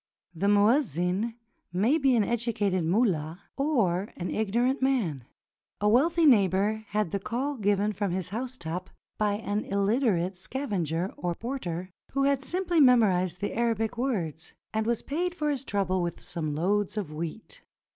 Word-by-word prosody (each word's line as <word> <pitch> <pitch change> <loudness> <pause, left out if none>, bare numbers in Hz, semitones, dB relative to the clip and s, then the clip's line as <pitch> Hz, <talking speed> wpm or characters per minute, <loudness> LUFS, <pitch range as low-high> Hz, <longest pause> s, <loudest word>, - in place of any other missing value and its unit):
The 180 +4 -1
muezzin 205 - +2 0.4
may 220 - +2
be 270 -3 +3
an 225 - +4
educated 210 -6 0
mullah 170 -3 0
or 220 - +1
an 180 - -3
ignorant 235 +6 +1
man. 210 - 0 0.5
A 210 - +1
wealthy 325 +9 +4
neighbor 210 -3 +3
had 210 -5 -1
the 200 - -1
call 255 +8 -2
given 205 -2 +1
from 200 0 -1
his 180 0 -3
housetop 190 -6 -4 0.3
by 210 -1 +2
an 205 0 -2
illiterate 200 -3 +1
scavenger 185 - -2
or 175 -1 -2
porter, 185 -8 -4 0.2
who 275 0 +1
had 275 -1 +2
simply 350 0 +1
memorized 185 - +4
the 205 - -2
Arabic 225 -1 0
words, 180 - -3 0.2
and 220 0 0
was 235 -1 0
paid 350 +5 -2
for 300 -3 0
his 275 -2 -2
trouble 195 -5 0
with 170 -1 -3
some 155 -3 -4
loads 200 +6 0
of 185 -8 -3
wheat. 170 - -6
210 Hz, 150 wpm, -28 LUFS, 180-250 Hz, 0.5 s, an